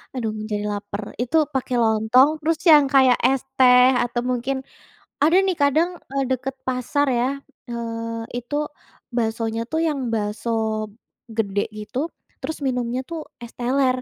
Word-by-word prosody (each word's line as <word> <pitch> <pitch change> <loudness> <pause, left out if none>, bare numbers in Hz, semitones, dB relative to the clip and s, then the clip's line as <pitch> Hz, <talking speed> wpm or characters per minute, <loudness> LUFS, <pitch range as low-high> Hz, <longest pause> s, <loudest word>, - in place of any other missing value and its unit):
aduh 230 -4 -1 0.2
jadi 205 0 -1
laper. 205 0 -5 0.2
Itu 250 +6 +1 0.2
pakai 255 -1 -1
lontong 220 +5 +4
terus 315 +1 0
yang 295 -2 +8
kayak 260 -2 +6
es 265 0 +2 0.2
teh 250 0 +7
atau 240 0 -2
mungkin 255 +2 -1 0.7
ada 325 +4 +5
nih 380 - +2
kadang, 310 +4 +3 0.2
eee, 275 0 0
deket 260 +1 -2
pasar 260 +3 0
ya, 245 0 +1 0.4
eee, 230 -1 -4 0.2
itu 245 +4 -6 0.6
baksonya 225 -1 -1
tuh 320 - 0
yang 295 -3 -1
bakso 210 +1 -2 0.8
gede 205 -3 -1
gitu. 215 +5 -5 0.4
Terus 320 - -4
minumnya 250 -1 -1
tuh 325 -2 -6 0.2
es 235 - -9
teler. 255 +1 +1
250 Hz, 140 wpm, -22 LUFS, 230-270 Hz, 0.8 s, yang